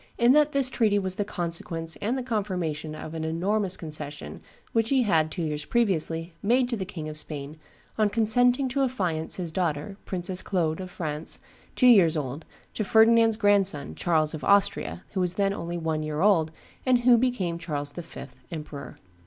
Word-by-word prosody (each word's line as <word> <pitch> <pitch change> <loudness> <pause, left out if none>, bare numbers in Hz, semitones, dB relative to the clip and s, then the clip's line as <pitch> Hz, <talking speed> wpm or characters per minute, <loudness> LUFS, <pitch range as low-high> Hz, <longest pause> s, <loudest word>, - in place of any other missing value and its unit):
in 240 +1 +5
that 300 0 +4
this 275 -2 +2
treaty 215 -4 +2
was 190 -2 0
the 205 - -1
consequence 165 -4 -3
and 235 +6 -1
the 260 - -3
confirmation 180 - -3
of 155 - -8
an 160 -1 -4
enormous 185 +4 0
concession 150 -2 -7 0.3
which 225 0 +1
he 265 -2 +3
had, 160 -7 +2
two 170 +2 -4
years 150 -1 -2
previously, 165 -6 0
made 245 +4 +2
to 245 - -1
the 195 -4 -4
King 165 -5 -7
of 155 - -6
Spain 150 -1 -5 0.4
on 215 -1 +4
consenting 245 +5 +3
to 260 +2 -2
affiance 180 -12 -1
his 175 -3 -4
daughter, 170 +2 -2
Princess 180 0 -1
Claude 165 -4 -1
of 185 - -7
France, 155 -3 -2 0.4
two 255 - +2
years 190 -10 +6
old, 145 +2 -4 0.3
to 215 - -2
Ferdinand's 225 +1 +5
grandson, 195 - +2
Charles 155 - +1
of 155 - -6
Austria, 200 -2 +2
who 195 - -3
was 180 -1 +1
then 195 0 +1
only 170 -2 -4
one 160 -2 -2
year 155 0 -3
old, 180 -6 +4 0.3
and 250 -2 +3
who 245 0 +6
became 220 -9 0
Charles 145 -4 -4
the 175 - -7
Fifth 170 - -11
(emperor)! 150 -3 -7
180 Hz, 185 wpm, -26 LUFS, 160-220 Hz, 0.4 s, years